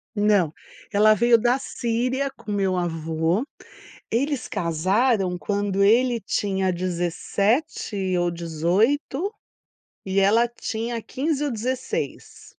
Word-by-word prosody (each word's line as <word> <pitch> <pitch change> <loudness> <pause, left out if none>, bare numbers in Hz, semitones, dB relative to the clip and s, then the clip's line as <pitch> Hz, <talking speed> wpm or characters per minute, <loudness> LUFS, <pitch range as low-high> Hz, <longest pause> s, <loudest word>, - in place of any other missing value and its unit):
Não, 205 -6 +3 0.4
ela 215 +1 +5
veio 235 +2 +4
da 245 +3 +2
Síria 255 +2 -1
com 210 - -9
meu 195 -2 +1
avô, 165 - -1 0.7
eles 270 +1 -1
casaram 190 +3 +1
quando 200 0 0
ele 235 +2 +3
tinha 190 -1 0
17 185 - -1
ou 175 0 +1
18, 195 - 0 0.7
e 190 0 -1
ela 225 +5 +4
tinha 230 0 -4
15 295 +5 -2
ou 280 - -1
16. 250 +3 -4
210 Hz, 105 wpm, -24 LUFS, 185-240 Hz, 0.7 s, ela